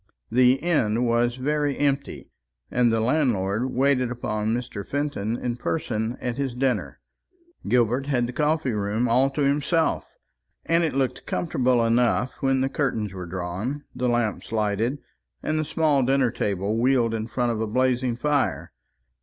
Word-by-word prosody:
The 125 +1 +5
inn 130 -7 +1
was 120 0 +2
very 145 +2 -1
empty, 140 -1 -1 0.4
and 120 -1 +3
the 115 - +1
landlord 115 -4 +1
waited 130 -1 +2
upon 110 -3 -2
Mr. 120 -3 -3
Fenton 130 -5 -2
in 120 -1 -3
person 115 -5 -2
at 120 0 -3
his 135 -3 -2
dinner. 130 0 -1 0.7
Gilbert 125 +2 +2
had 125 -4 +1
the 125 - -5
coffee 150 -2 +1
room 105 +3 0
all 130 +4 +3
to 140 +2 -3
himself, 150 +4 +1 0.5
and 165 +1 +2
it 160 -4 -1
looked 135 -2 -1
comfortable 125 -7 +1
enough 120 +2 +1
when 135 -1 +2
the 135 - +2
curtains 115 -8 -1
were 90 -2 -6
drawn, 95 +11 -4
the 125 0 -1
lamps 120 -3 -1
lighted, 110 +4 0 0.5
and 155 0 0
the - - +1
small 150 -2 +2
dinner 130 -1 +2
table 100 +2 -1
wheeled 120 -2 +2
in 110 0 -3
front 120 0 0
of 110 -1 -2
a 110 - -1
blazing 125 +1 +1
fire. 145 +2 0
125 Hz, 155 wpm, -24 LUFS, 115-140 Hz, 0.7 s, The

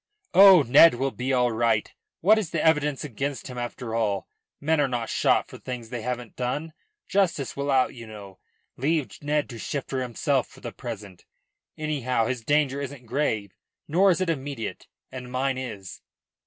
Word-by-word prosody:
"Oh, 190 -5 +9
Ned 140 +4 +7
will 135 +2 -1
be 130 +2 -3
all 125 -2 +3
right. 115 -1 +1 0.3
What 215 +5 +5
is 195 -7 -3
the 165 -1 -1
evidence 150 -3 +2
against 140 -1 -4
him 125 -1 -6
after 120 -1 -5
all? 105 -4 0 0.3
Men 155 +1 +2
are 140 - +2
not 120 -3 -3
shot - - +2
for - - -11
things 120 -3 -6
they 120 -2 -4
haven't 125 -1 -5
done. 145 +6 -3 0.3
Justice 180 -9 0
will 140 +1 -3
out, 130 -2 +3
you 115 -2 -10
know. 100 -3 -11 0.4
Leave 150 +2 -1
Ned 150 0 0
to 115 - -8
shift 140 +3 -4
for 130 -1 -1
himself 130 +2 0
for - - -17
the - - -6
present. 105 -7 -8 0.5
Anyhow 130 -7 0
his 125 -1 -3
danger 140 0 +1
isn't 135 -2 -7
grave, 110 -6 -1 0.3
nor 185 +6 +4
is 180 - +3
it 185 -2 0
immediate, 135 -6 -5 0.2
and 125 -1 -8
mine 130 +1 0
is." 105 -8 -7
130 Hz, 180 wpm, -25 LUFS, 120-150 Hz, 0.5 s, Oh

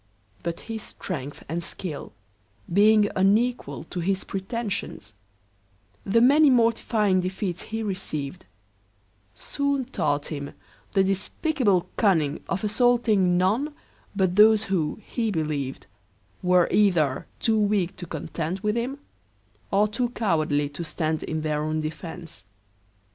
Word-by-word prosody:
But 170 -1 -4
his 225 -1 -6
strength 145 -9 -6
and 170 +3 -2
skill 160 -5 -5 0.6
being 210 +2 +5
unequal 200 - +1
to 180 - -3
his 190 +2 0
pretensions, 195 - -4 0.9
the 230 +4 +3
many 285 +4 +6
mortifying 225 -5 +3
defeats 185 -1 -3
he 225 0 -4
received, 155 - -4 0.9
soon 280 -2 -1
taught 145 - -1
him 140 -2 -5 0.4
the 195 -2 +4
despicable 200 - 0
cunning 160 -9 +2
of 190 +2 -2
assaulting 215 -5 +3
none 230 +12 +1 0.4
but 190 -3 +1
those, 215 0 +7
who, 185 -6 -1
he 230 -2 -1
believed, 150 -7 -2 0.6
were 180 -1 +4
either 170 -10 +2
too 220 -1 +2
weak 200 -3 +1
to 175 - -7
contend 165 +3 -4
with 210 +1 0
him, 250 +4 -2 0.7
or 205 +2 +3
too 235 +3 -1
cowardly 155 -11 0
to 145 +4 -6
stand 155 -1 -1
in 155 0 -3
their 150 -1 -1
own 155 +1 -1
defence. 160 - -7
190 Hz, 120 wpm, -25 LUFS, 160-220 Hz, 0.9 s, those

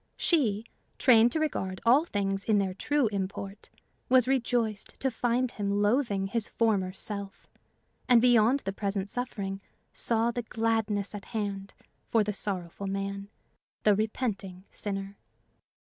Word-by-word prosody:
She, 230 - +2 0.3
trained 235 -2 +6
to 320 - 0
regard 190 -12 -2
all 265 +7 +5
things 195 - -1
in 215 -2 +3
their 195 -2 0
true 290 +8 +1
import, 195 0 -5 0.4
was 255 -1 +5
rejoiced 240 -5 -1
to 265 - 0
find 245 +1 0
him 205 0 -1
loathing 205 -3 +1
his 220 +2 +1
former 205 -5 +1
self, 200 0 -6 0.6
and 245 -2 +7
beyond 245 +2 +4
the 195 - -4
present 200 0 -3
suffering 200 -6 -3 0.3
saw 230 0 +1
the 240 - -3
gladness 225 -3 -1
at 205 -1 -7
hand 200 -3 -4 0.3
for 225 -2 +3
the 210 0 -2
sorrowful 195 -1 -3
man, 195 +1 -3 0.5
the 210 - +5
repenting 200 -3 -2
sinner. 195 -1 -4
210 Hz, 135 wpm, -29 LUFS, 195-235 Hz, 0.6 s, and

